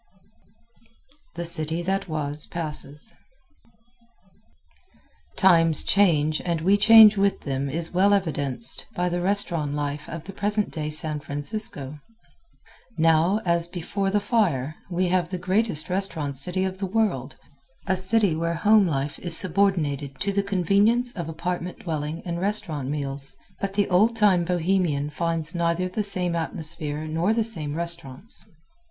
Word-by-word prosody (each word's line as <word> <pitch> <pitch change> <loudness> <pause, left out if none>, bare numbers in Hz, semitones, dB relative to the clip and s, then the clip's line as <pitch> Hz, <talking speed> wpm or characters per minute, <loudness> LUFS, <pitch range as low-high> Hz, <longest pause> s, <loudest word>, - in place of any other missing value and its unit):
The 170 0 -4
City 165 0 -1
That 195 +2 -2
Was 150 -1 -2
Passes 150 +2 -6 2.2
Times 165 -5 +4
change 155 -6 +2
and 170 -2 -1
we 190 +5 +3
change 215 0 +7
with 200 0 +1
them 140 0 -3
is 165 +5 -2
well 190 +3 +3
evidenced 160 - -1
by 180 0 0
the 175 0 -2
restaurant 175 -6 0
life 145 0 -4
of 165 -1 -7
the 195 - -10
present 205 +1 0
day 150 -1 -4
San 155 0 +3
Francisco. 145 - -5 1.0
Now, 165 +5 +3
as 170 -1 +1
before 195 +3 -3
the 205 +2 +1
fire, 190 - 0 0.2
we 180 0 0
have 180 -1 0
the 185 - -3
greatest 185 -2 0
restaurant 165 -7 -2
city 180 +8 -1
of 190 0 -5
the 195 - -2
world 180 - -1 0.5
a 190 - +1
city 190 -1 +2
where 170 +1 -2
home 205 +3 +4
life 140 -2 -3
is 170 -2 +7
subordinated 155 -8 +2
to 200 - 0
the 200 - +1
convenience 200 +6 +1
of 170 -8 -6
apartment 175 +2 -4
dwelling 155 -1 -5
and 170 -1 -4
restaurant 185 -9 -1
meals 135 -2 -5 0.2
but 195 0 -4
the 205 -1 +1
old 215 +6 +3
time 195 -6 +3
Bohemian 170 -4 0
finds 165 +1 -2
neither 170 +1 0
the 185 +4 -3
same 185 -4 -1
atmosphere 155 -2 -4
nor 165 +7 0
the 230 - +1
same 160 -10 -1
restaurants. 170 - -3
170 Hz, 145 wpm, -24 LUFS, 155-195 Hz, 2.2 s, change